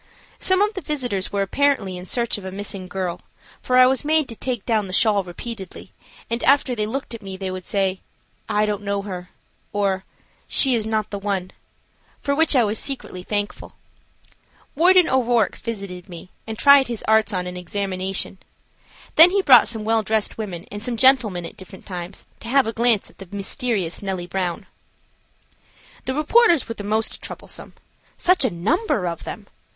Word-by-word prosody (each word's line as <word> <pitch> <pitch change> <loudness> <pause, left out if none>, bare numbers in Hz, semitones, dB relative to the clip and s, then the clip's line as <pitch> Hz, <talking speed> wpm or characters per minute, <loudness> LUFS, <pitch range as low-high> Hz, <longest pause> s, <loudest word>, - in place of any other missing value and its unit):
Some 375 +1 +3
of 420 +1 0
the 380 - -5
visitors 250 - -2
were 200 -1 0
apparently 220 -4 +1
in 180 +1 -8
search 235 -1 0
of - - -12
a 190 - -6
missing 195 -1 -6
girl, 180 -2 -4 0.4
for 255 - +1
I 255 - +9
was 260 0 +2
made 310 -1 +2
take 245 -6 -3
down 215 -4 +1
the 185 - -8
shawl 210 0 +3
repeatedly, 190 +2 -8 0.4
and 235 +1 -2
after 275 -2 +3
they 210 -3 -1
looked 265 +2 -4
at 230 - -7
me 195 -1 -7
they 190 -1 -4
would 185 0 -6
say, 190 0 0 0.5
"I 210 +1 +2
don't 210 -1 -2
know 200 -1 -2
her," 180 -2 -7 0.4
"or, 195 -2 0 0.4
"she 265 -2 +6
is 220 -2 0
not 220 -1 -1
the 200 - -4
one," 195 -2 -2 0.7
for 280 - -1
which 320 +1 +3
I 250 - +5
was 215 0 0
secretly 260 -9 -3
thankful. 205 +2 -3 1.0
Warden 360 +3 +5
O'Rourke 240 -4 +2
visited 195 -5 -6
me, 175 +1 -10 0.2
and 220 -1 -5
tried 280 +1 +6
his 235 -3 -3
arts 220 -1 +4
on 180 -2 -2
an 180 0 -6
examination. 190 +1 -3 0.8
Then 330 +3 +10
he 395 +1 +1
brought 255 -7 +7
some 225 -2 -4
well 225 +1 +2
dressed 215 0 -1
women 190 -6 -6
and 205 +1 -7
some 235 0 -1
gentlemen 225 -9 +4
at - - -9
different 190 0 -13
times 180 0 -7
to - - -9
have 270 +2 +3
a 225 - -3
glance 230 -3 +2
at - - -30
the 195 - -10
mysterious 200 - -2
Nellie 190 -3 -3
Brown. 180 +2 -3 1.4
The 260 0 -2
reporters 335 - +4
were 230 - -4
the 210 - -8
most 215 +2 -1
troublesome. - - -8 0.4
Such 365 -3 +3
a 255 - +3
number 210 - 0
of 170 -2 -4
them! - - -7
210 Hz, 180 wpm, -22 LUFS, 190-255 Hz, 1.4 s, Then